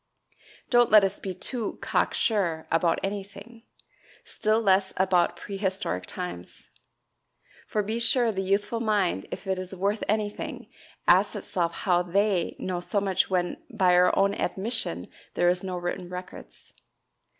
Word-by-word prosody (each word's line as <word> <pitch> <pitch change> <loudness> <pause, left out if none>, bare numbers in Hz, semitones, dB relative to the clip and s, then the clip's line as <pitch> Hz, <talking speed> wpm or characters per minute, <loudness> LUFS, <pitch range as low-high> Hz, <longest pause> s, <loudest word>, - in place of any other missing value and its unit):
Don't 240 -1 +5
let 210 -1 +7
us 195 - -1
be 190 - -4
too 230 +3 -4
"cock - - 0
sure" 175 -8 0
about 165 0 +2
anything 205 +4 -6 0.6
still 215 +1 +1
less 190 -3 +2
about 185 -2 +2
prehistoric 190 - -3
times. 180 - -7 1.0
For 210 - 0
be 220 +3 -2
sure 235 0 +3
the 195 -2 -2
youthful 200 +4 0
mind, 205 - 0
if - - -7
it 190 -1 -1
is 185 +1 -5
worth 200 +3 -1
anything, 210 -1 -3 0.4
asks - - +5
itself 170 -3 -2
how 180 -2 +4
"they" 190 0 +1
know 180 -1 -3
so 190 +3 -1
much 195 -2 +1
when 180 -2 0
by 190 -7 +3
our 180 0 +5
own 200 0 +3
admission 195 - -3 0.3
there 175 - +2
are 175 - +6
no 185 -2 -4
written 175 0 -4
records. 180 - -10
190 Hz, 145 wpm, -27 LUFS, 180-210 Hz, 1.0 s, let